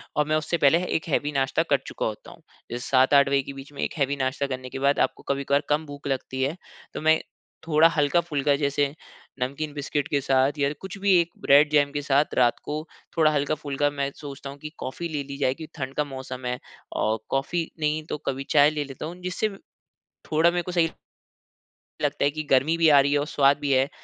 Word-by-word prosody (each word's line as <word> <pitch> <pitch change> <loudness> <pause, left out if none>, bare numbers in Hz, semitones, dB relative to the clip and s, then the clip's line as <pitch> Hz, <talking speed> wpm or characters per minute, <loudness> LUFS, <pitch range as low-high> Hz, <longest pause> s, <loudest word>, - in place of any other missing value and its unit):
और 150 - +2
मैं 155 - +2
उससे 155 +2 0
पहले 165 +4 +4
1 160 -3 -2
हेवी 145 0 0
नाश्ता 135 +3 +1
कर 140 - +5
चुका - - -3
होता 110 -1 -5
हूँ। - - -16 0.3
जैसे 120 +1 -5
7-8 140 +1 +5
बजे 140 0 +3
के 140 - -7
बीच 135 +1 -11
में 140 - -6
एक - - -2
हेवी 140 -1 +1
नाश्ता 135 +1 -1
करने 130 -1 -5
के 135 - -6
बाद 140 +1 +2
आपको - - 0
कभी-कभार 140 +1 +1
कम 150 +2 +1
भूख 145 -1 -8
लगती 130 -1 -3
है 140 +5 -1 0.4
तो - - -5
मैं 160 0 +4 0.5
थोड़ा 160 0 +6
हल्का-फुल्का 150 -2 +1
जैसे 140 0 0 0.5
नमकीन 140 +4 -3
बिस्किट 145 0 -2
के 145 - +1
साथ 135 +2 +2
या 140 0 +2
कुछ 190 0 -8
भी 200 0 +3
एक 170 0 +1
ब्रेड-जेम 145 0 +5
के 145 0 -2
साथ 145 +1 +2
रात 120 -2 +3
को 150 - -4 0.4
थोड़ा 155 -2 +5
हल्का-फुल्का 145 -1 0
मैं 140 -1 -2
सोचता 140 -1 -8
हूँ 140 - -9
कि 150 - -7
कॉफी 170 +6 -5
ले 150 -3 -3
ली 140 0 -8
जाए 130 -2 +1
क्योंकि 160 +2 -10
ठंड 130 -1 -4
का 150 - +1
मौसम 130 -2 -7
है। 125 0 -2 0.3
और 110 +1 0
कॉफी 160 +5 -1
नहीं 155 0 0
तो - - -2
कभी 135 0 -1
चाय 145 -1 +6
ले 150 -1 -2
लेता 135 0 -7
हूँ 165 +3 -6
जिससे 185 +4 -1 0.8
थोड़ा 160 +2 +5
मेरे 175 0 -1
को 180 - -5
सही 170 -2 +2 1.1
लगता 145 0 0
है - - +4
कि 155 +1 -4
गर्मी 135 +5 +4
भी 165 -1 +4
आ 145 -2 +7
रही 140 +1 +3
है 145 - +3
और 145 - -1
स्वाद 140 -2 +3
भी 145 -1 -1
है 135 +1 +3
145 Hz, 220 wpm, -25 LUFS, 135-155 Hz, 1.1 s, आ